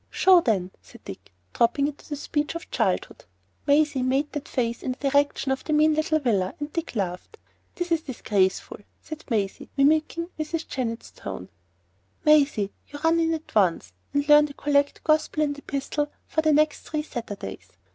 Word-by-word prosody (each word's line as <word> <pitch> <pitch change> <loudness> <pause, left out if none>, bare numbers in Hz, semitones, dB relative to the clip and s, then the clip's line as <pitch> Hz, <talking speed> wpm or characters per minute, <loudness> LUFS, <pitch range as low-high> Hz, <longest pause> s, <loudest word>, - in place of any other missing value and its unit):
"Show, 370 -2 +5
then," 190 - 0
said - - -17
Dick, - - -10 0.2
dropping 240 +4 +2
into 295 +1 -9
the 295 - -2
speech 295 +2 -2
of 335 - -7
childhood. - - -1 0.4
Maisie 290 -2 +3
made 270 +3 0
that 295 -2 -5
face 235 -2 -2
in 255 - -2
the 275 +2 -2
direction 285 -1 +2
of 265 - -2
the 310 - -2
mean 305 +1 +4
little 310 0 +1
villa, 210 -10 0
and 295 +1 -5
Dick 335 -6 -4
laughed. 185 - -4 0.4
""This 350 -1 -4
is 330 -1 +2
disgraceful,"' 205 -9 -1 0.2
said 310 0 -9
Maisie, 205 -5 -2
mimicking 310 +4 +2
Mrs. 315 +1 -3
Jennett's 235 -3 -4
tone. 95 -2 -8 0.8
""Maisie, 280 -10 +4 0.2
you 290 - -9
run 325 +1 +4
in 325 0 +2
at 315 - -10
once, 175 - +2 0.2
and 285 0 0
learn 295 0 +7
the 285 - -12
collect, 285 -1 +1
gospel, 310 0 +2
and 290 -1 -1
epistle 290 +1 -3 0.2
for 315 - 0
the 310 -1 +3
next 300 0 +3
three 305 -1 -1
Sundays. 230 -8 -7
290 Hz, 175 wpm, -25 LUFS, 240-310 Hz, 0.8 s, learn